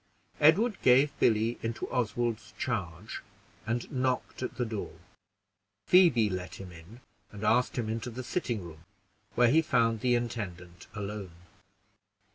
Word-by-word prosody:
Edward 190 +9 +4
gave 135 +3 +5
Billy 110 +1 +2
into 115 0 -3
Oswald's 115 -4 -2
charge, 95 -6 -4 0.5
and 115 +1 -2
knocked 130 -1 -1
at 130 - -4
the 125 - -1
door. 110 -2 -5 0.9
Phoebe 165 - +5
let 90 -2 -4
him 95 -2 -9
in, 85 +9 -14 0.3
and 105 0 -9
asked 125 +5 +2
him 115 -3 -1
into 115 +2 -3
the 125 +2 -6
sitting 120 - -2
room, 80 -1 -12 0.5
where 120 -1 +5
he 160 +3 +5
found 115 -7 +2
the 125 +2 +2
intendant 95 -7 -5
alone. 100 -3 -5
115 Hz, 135 wpm, -30 LUFS, 100-125 Hz, 0.9 s, gave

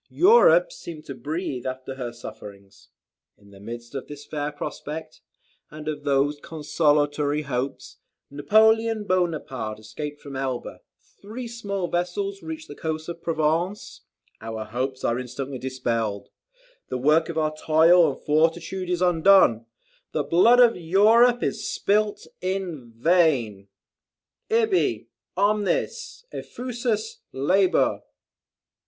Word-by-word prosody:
Europe - - +5
seemed 160 - -9
to 140 - -6
breathe 140 0 -4
after 130 +1 -5
her 125 -3 -5
sufferings. 105 -4 -12 0.5
In 100 -1 -20
the 100 - -15
midst 120 +4 -9
of 135 - -5
this 145 0 -10
fair 150 -1 -3
prospect, 155 +1 -7 0.5
and 150 0 -10
of 150 -1 -4
these 145 +1 +1
consolatory 150 -1 0
hopes, 135 -1 -4 0.3
Napoleon 220 +8 +3
Bonaparte 155 - -2
escaped 145 +8 -7
from 140 -2 -9
Elba; 130 -2 -4 0.4
three 230 +5 -7
small 200 -6 -4
vessels 390 - -2
reached 320 0 -7
the - - -9
coast 160 0 -4
of 170 -1 -7
Provence; 165 +5 -1 0.4
our 110 0 -5
hopes 130 +4 -4
are 120 +1 0
instantly 130 +1 -6
dispelled; 115 -6 -2 0.6
the 130 - -2
work 155 +6 +3
of 165 - -5
our 155 -1 0
toil 160 +2 +5
and - - -10
fortitude 165 +4 0
is 180 0 0
undone; 175 - +4 0.5
the 150 - 0
blood 180 - +5
of 240 -2 +6
Europe 220 +8 +4
is 215 -1 -2
spilt 210 +1 0 0.2
in 185 -10 -4
vain 125 - +2 0.8
"'Ibi 440 -4 +1 0.3
omnis 215 - -1
effusus 245 - -3
labor!'" 185 +8 +2
155 Hz, 120 wpm, -24 LUFS, 130-200 Hz, 0.8 s, of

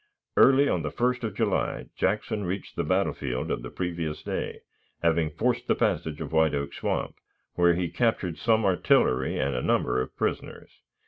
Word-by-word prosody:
Early 135 +1 +6
on 90 - +1
the 75 - -2
1st 125 +4 0
of 105 - -4
July - - 0
Jackson 105 +2 -1
reached 95 +1 -4
the - - -1
battlefield 65 -2 -1
of - - -2
the - - -7
previous 85 -4 -4
day, - - -4 0.4
having 80 -1 +2
forced 115 +11 -1
the - - +3
passage 75 -2 -1
of 75 -3 -5
White 80 -2 +3
Oak 70 0 -3
Swamp, - - -2 0.4
where 85 -1 +4
he 90 0 -1
captured 95 -5 -1
some 110 -2 +2
artillery 65 -8 +2
and 70 +1 0
a 60 - -1
number 65 - +1
of 65 - -7
prisoners. - - -3
85 Hz, 175 wpm, -27 LUFS, 75-105 Hz, 0.4 s, Early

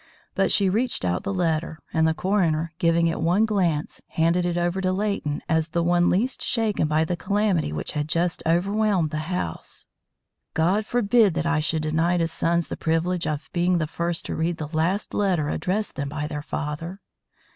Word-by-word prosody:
But - - +1
she 200 - +3
reached 225 - 0
out 90 0 0
the 200 - -3
letter, 165 -4 -1 0.2
and 160 -1 +3
the 160 - +1
coroner, 170 -4 +1
giving 165 -1 +3
it 165 -1 0
one 180 +7 +3
glance, 180 -8 0
handed 170 +2 +1
it 175 0 -1
over 175 +2 0
to 185 -1 +1
Leighton 190 -7 -1
as 160 -1 +1
the 170 +1 0
one 175 +1 +3
least 240 +8 0
shaken 220 -8 0
by 155 +1 +2
the 175 - -1
calamity 200 - 0
which 75 - -3
had 150 0 -3
just 170 +2 0
overwhelmed 190 0 +1
the 155 +2 -4
house. 80 - -4 0.7
"God 190 +7 +2
forbid 225 -5 +3
that 170 -1 -1
I 165 -2 +2
should 155 +1 -1
deny 165 +3 +1
to 165 -1 +1
sons 170 +1 0
the - - -5
privilege 165 +2 0
of 150 -1 -3
being 175 +1 +2
the 160 - 0
first 170 +2 -2
to - - -3
read 165 +1 -1
the 155 +1 -6
last 180 +6 0
letter 180 -7 +1
addressed 205 +7 -1
them 140 0 -3
by 150 0 -3
their 150 -1 -4
father." 160 +5 -4
170 Hz, 190 wpm, -24 LUFS, 160-190 Hz, 0.7 s, she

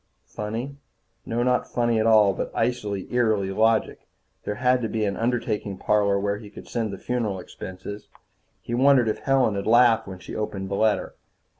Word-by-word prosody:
Funny? 115 +7 -5 0.5
No, 120 +1 0
not 125 0 0
funny 120 -2 +1
at 110 - +2
all, 105 -3 +5
but - - -4
icily, 105 -5 -1
eerily 110 -5 +1
logical. 110 +2 +1 0.4
There 105 - -2
had 125 +2 +2
to 115 - -2
be 110 -1 -1
an 100 -1 -1
undertaking 115 -4 -2
parlor 100 0 +2
where 100 +1 -1
he 105 - -11
could - - -12
send 115 -3 -2
the 100 - -6
funeral 110 -4 -2
expenses. 95 +3 -9 0.6
He 120 - -5
wondered 130 -1 +4
if 110 - -1
Helen 135 -5 +2
had 100 +1 -3
laughed 120 -1 +5
when 95 -1 -7
she - - -9
opened 95 -3 -4
the 100 - -2
letter. 110 +1 +1
110 Hz, 180 wpm, -24 LUFS, 100-120 Hz, 0.6 s, all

